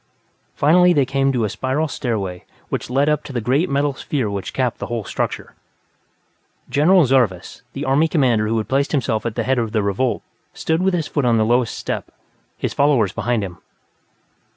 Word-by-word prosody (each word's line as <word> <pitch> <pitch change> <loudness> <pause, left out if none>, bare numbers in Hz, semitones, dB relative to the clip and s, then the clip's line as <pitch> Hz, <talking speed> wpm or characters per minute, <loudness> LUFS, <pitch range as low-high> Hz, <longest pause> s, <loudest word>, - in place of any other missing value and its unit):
Finally, 180 +4 +5
they 140 -4 +3
came 135 +1 +1
to 125 -3 0
the - - +1
spiral 130 +9 -1
stairway 100 -10 -3 0.3
which - - -3
led 135 +3 +2
up 150 -1 +1
to - - -9
the 125 - -2
great 135 +10 +1
metal 140 +1 +1
sphere 130 -5 -2
which 100 -1 -4
capped 125 -3 -1
the - - -4
whole 120 -2 -3
structure. - - -4 1.2
General 170 +4 +5
Zarvas, 120 -9 0
the - - -4
Army 140 +5 +3
Commander 125 -9 +2
who 115 +1 0
had 110 - -2
placed 140 +3 0
himself 120 -5 0
at 115 - -5
the - - -1
head 130 -1 +1
of 115 -2 -2
the 110 -2 +1
revolt, 100 +6 -1 0.3
stood 160 +2 0
with 190 -1 +2
his 165 -3 -1
foot 145 - -2
on 120 -2 +3
the 110 - +2
lowest 120 +1 +1
step, - - -4 0.5
his - - -3
followers 130 -9 +2
behind 120 -3 -1
him. 90 -4 -7
130 Hz, 195 wpm, -20 LUFS, 110-145 Hz, 1.2 s, Finally